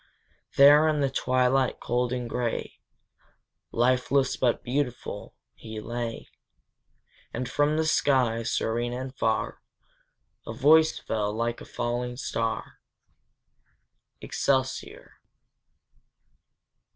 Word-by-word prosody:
There 145 +3 +7
in 150 -2 +1
the 135 -1 +1
twilight 130 0 +1
cold 125 0 -1
and 125 -1 -3
gray, 120 0 -3 0.9
Lifeless, 130 +3 +2
but 120 -2 0
beautiful, 125 -1 -3 0.2
he 110 -1 -8
lay, 120 +1 -5 1.0
And 125 +2 -4
from 145 +4 +1
the 160 - +1
sky, 130 -7 +2
serene 120 +1 -1
and 130 +1 -6
far, 110 -3 -1 0.9
A 115 - -4
voice 155 +6 +5
fell, 105 -2 -2
like 115 +2 -2
a - - -9
falling 120 +1 -3
star, 115 -3 -3 1.4
Excelsior! 130 -1 -2
125 Hz, 95 wpm, -27 LUFS, 120-135 Hz, 1.4 s, There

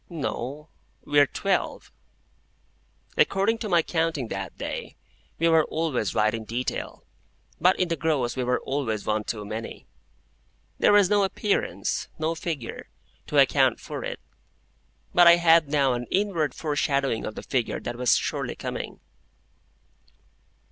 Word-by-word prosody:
No. 150 -2 -5 0.4
We 145 0 +3
are 145 - +6
twelve." 195 +6 -2 1.3
According 205 +4 +2
to 215 - -4
my 170 -3 +4
counting 160 -8 -1
that 95 0 -5
day, - - -5 0.4
we 165 - +2
were 160 -1 +4
always 150 -10 -2
right 110 0 +3
in 115 -1 -4
detail, 120 +4 -4 0.6
but 185 +1 +3
in 185 - +2
the 170 - -1
gross 140 -6 0
we 130 - -1
were 125 0 +1
always 120 -7 -2
one 105 0 0
too 105 -3 -4
many. 110 +2 -6 0.9
There - - +5
was 205 -1 +5
no 205 -1 +4
appearance—no 190 -5 -1
figure—to 160 -7 -6
account - - +4
for - - -6
it; - - -5 0.9
but 175 -1 +7
I 170 - +9
had 165 -2 +5
now 140 -3 +2
an 120 0 -4
inward 185 -8 0
foreshadowing 140 -5 0
of 110 - -5
the - - -7
figure 125 -3 -1
that - - -5
was 125 -1 +3
surely - - -2
coming. - - -6
150 Hz, 140 wpm, -25 LUFS, 120-170 Hz, 1.3 s, I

